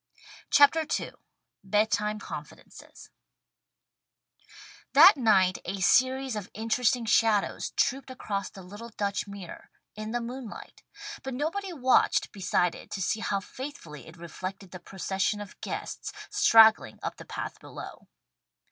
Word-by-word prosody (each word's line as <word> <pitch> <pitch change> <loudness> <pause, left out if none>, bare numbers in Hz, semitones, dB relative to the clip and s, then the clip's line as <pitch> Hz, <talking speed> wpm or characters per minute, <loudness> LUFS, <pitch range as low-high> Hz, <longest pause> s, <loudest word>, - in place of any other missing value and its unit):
'" - - -16
CHAPTER 290 +3 +6 0.2
II - - -7 0.5
BED 210 +3 +1
TIME 210 +1 0
CONFIDENCES 210 - -11 1.8
THAT 390 - +9
night 195 -8 +3
a 195 - -4
series 260 +6 +3
of 205 -3 -6
interesting 230 +2 +1
shadows 215 -1 +2
trooped 270 0 0
across 200 -6 -4
the 190 - -12
little 205 +6 -10
Dutch 205 -2 -3
mirror, 200 -3 -10 0.3
in 215 +1 -6
the 240 +2 -1
moonlight, 240 0 -8 0.4
but 265 -1 -5
nobody 360 +8 -3
watched 260 -6 +2
beside 180 -3 0
it - - -12
to - - -5
see 205 +4 -1
how 200 -3 -1
faithfully 195 - -9
it 160 +2 -13
reflected 185 +3 -7
the 185 - -8
procession 190 +3 -2
of 205 -1 -10
guests, - - -5 0.2
straggling 220 -1 +5
up - - -4
the - - -10
path - - -6
below. - - -10
215 Hz, 135 wpm, -28 LUFS, 195-250 Hz, 1.8 s, THAT